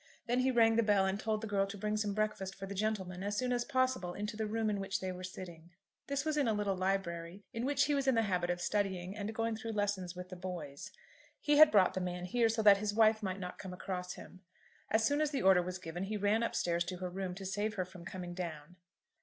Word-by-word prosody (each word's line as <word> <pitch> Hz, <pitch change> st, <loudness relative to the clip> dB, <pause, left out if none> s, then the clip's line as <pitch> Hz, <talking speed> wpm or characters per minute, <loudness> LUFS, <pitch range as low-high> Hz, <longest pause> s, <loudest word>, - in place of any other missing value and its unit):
Then 245 Hz, +1 st, +1 dB
he 255 Hz, +1 st, +3 dB
rang 225 Hz, -3 st, +4 dB
the -, -, +6 dB
bell 205 Hz, -3 st, +3 dB
and 190 Hz, +1 st, 0 dB
told 215 Hz, -1 st, -1 dB
the 220 Hz, -, -4 dB
girl 200 Hz, -1 st, +1 dB
to 200 Hz, +1 st, -7 dB
bring 210 Hz, +1 st, -1 dB
some 210 Hz, -2 st, -1 dB
breakfast 210 Hz, -3 st, -1 dB
for 195 Hz, -, -6 dB
the 195 Hz, -, -6 dB
gentleman 195 Hz, -3 st, -2 dB
as 205 Hz, +1 st, -2 dB
soon 250 Hz, -1 st, +1 dB
as 240 Hz, -1 st, +1 dB
possible 255 Hz, -9 st, 0 dB
into 210 Hz, +2 st, -4 dB
the 220 Hz, 0 st, -2 dB
room 220 Hz, +1 st, -1 dB
in 205 Hz, -2 st, 0 dB
which 195 Hz, 0 st, -2 dB
they 185 Hz, -1 st, -3 dB
were 180 Hz, 0 st, -7 dB
sitting. 175 Hz, -3 st, -8 dB, 0.4 s
This 280 Hz, +1 st, -1 dB
was 310 Hz, -1 st, 0 dB
in 285 Hz, -4 st, +2 dB
a 220 Hz, -, +2 dB
little 205 Hz, -2 st, 0 dB
library 185 Hz, -1 st, -2 dB
in 230 Hz, +2 st, -2 dB
which 280 Hz, -1 st, +3 dB
he 295 Hz, -, +1 dB
was 275 Hz, -1 st, 0 dB
in 265 Hz, -, +4 dB
the 225 Hz, -, +3 dB
habit 180 Hz, -4 st, 0 dB
of 175 Hz, 0 st, 0 dB
studying 190 Hz, -2 st, -1 dB
and 210 Hz, 0 st, -3 dB
going 225 Hz, 0 st, 0 dB
through 225 Hz, +1 st, -5 dB
lessons 200 Hz, -4 st, -1 dB
with 180 Hz, 0 st, -7 dB
the 185 Hz, -, -7 dB
boys. 180 Hz, -1 st, -6 dB, 0.5 s
He 295 Hz, 0 st, +2 dB
had 310 Hz, 0 st, +10 dB
brought 195 Hz, -4 st, +5 dB
the 185 Hz, -, -2 dB
man 180 Hz, 0 st, -3 dB
here 230 Hz, +5 st, +2 dB
so 225 Hz, 0 st, 0 dB
that 205 Hz, -2 st, +8 dB
his 205 Hz, 0 st, -2 dB
wife 220 Hz, 0 st, +5 dB
might 190 Hz, -2 st, -3 dB
not 180 Hz, -1 st, -6 dB
come 185 Hz, -2 st, -7 dB
across 180 Hz, 0 st, -4 dB
him. 185 Hz, -, -12 dB, 0.5 s
As 220 Hz, 0 st, +3 dB
soon 285 Hz, +5 st, +2 dB
as 305 Hz, -, +2 dB
the 280 Hz, -7 st, -2 dB
order 190 Hz, -1 st, +6 dB
was 180 Hz, +1 st, -4 dB
given, 175 Hz, +1 st, -5 dB
he 210 Hz, +2 st, -3 dB
ran 205 Hz, +2 st, +2 dB
up 230 Hz, -, -1 dB
stairs 170 Hz, 0 st, +1 dB
to 185 Hz, -, -4 dB
her 180 Hz, 0 st, -4 dB
room, 185 Hz, -1 st, -4 dB
to 195 Hz, 0 st, -7 dB
save 205 Hz, +3 st, -1 dB
her 185 Hz, -, -1 dB
from 180 Hz, -1 st, -12 dB
coming 175 Hz, 0 st, -6 dB
down. 170 Hz, -1 st, -6 dB
200 Hz, 265 wpm, -34 LUFS, 180-220 Hz, 0.5 s, had